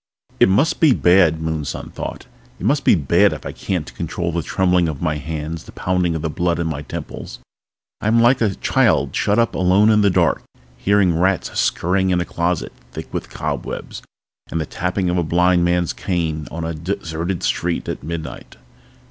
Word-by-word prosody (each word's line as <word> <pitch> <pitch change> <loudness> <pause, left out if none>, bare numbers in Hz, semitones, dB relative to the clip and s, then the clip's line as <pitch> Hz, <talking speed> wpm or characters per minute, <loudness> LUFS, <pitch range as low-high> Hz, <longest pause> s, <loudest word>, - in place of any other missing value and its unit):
It - - +6
must 135 - +2
be 155 -5 +6
bad, 85 -3 +4
Moonson 80 -3 -4
thought. - - -6 0.3
It - - -5
must 145 0 +2
be - - +5
bad 70 -6 +3
if - - -9
I - - -4
can't 80 -10 -4
control 85 +7 -3
the 85 +1 -1
trembling 90 0 +1
of 75 -4 -5
my 75 -2 -1
hands, 80 +2 -5
the - - -12
pounding 90 -2 0
of 80 - -4
the 80 - -1
blood 85 +1 0
at 85 - -1
my 80 -3 -3
temples. 75 - -7 0.6
I - - -1
am 115 +2 +4
like 120 +2 +4
a 105 -4 +1
child - - +2
shut 100 - +1
up 115 -1 +2
alone 95 +4 +4
in 105 -1 +4
the 100 - +4
dark, 90 - +2 0.3
hearing 95 +2 +2
rats 95 0 +1
scurrying 95 +2 +1
in 90 -1 +2
a 85 - -1
closet 85 0 -2 0.2
thick - - -8
with - - -4
cobwebs - - -5 0.5
and 85 - -2
the 80 - -1
tapping 90 +4 -2
of 90 0 +1
a - - +1
blind 90 +2 +3
man's 85 -1 +1
cane 80 -4 -2
on 85 0 -5
a 85 - -3
deserted 85 +1 -3
street 85 0 -1
at - - -4
midnight. 80 +1 -7
85 Hz, 190 wpm, -20 LUFS, 80-95 Hz, 0.6 s, It